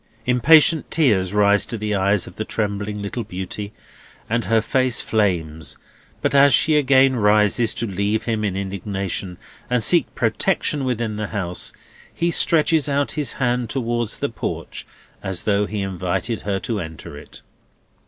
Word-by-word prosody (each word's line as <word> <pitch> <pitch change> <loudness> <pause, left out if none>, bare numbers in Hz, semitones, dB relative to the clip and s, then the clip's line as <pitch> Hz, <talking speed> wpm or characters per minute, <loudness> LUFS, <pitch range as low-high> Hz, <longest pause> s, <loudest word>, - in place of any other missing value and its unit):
Impatient 150 +5 +4
tears 105 - +2
rise 105 0 +4
to 115 - -3
the 105 0 -3
eyes 100 0 +1
of - - -12
the 110 - -3
trembling 105 -1 -3
little 115 +4 -4
beauty, 100 +1 -6 0.6
and 120 +1 -1
her 115 0 +3
face 130 +3 +1
flames; 85 -8 -1 0.5
but - - +1
as 140 -2 +6
she 155 +7 +3
again 135 -2 +4
rises 105 +1 +2
to 115 - -2
leave 100 +2 -1
him 110 -2 -2
in 100 -2 -1
indignation, 95 -1 -4 0.3
and 125 -2 +1
seek 170 +3 +3
protection 140 - 0
within 120 -4 -2
the 105 -1 -3
house, 90 -5 -3 0.4
he 170 +1 -1
stretches 160 -2 +2
out 140 0 0
his 150 -6 -2
hand 125 -3 -1
towards 120 -3 -2
the - - -2
porch, - - -6 0.3
as 95 -2 -3
though 105 -1 +1
he 105 -1 -4
invited 95 +4 -3
her 100 -1 -2
to 105 +3 -3
enter 80 -4 -8
it. 75 - -13
110 Hz, 155 wpm, -21 LUFS, 100-125 Hz, 0.6 s, as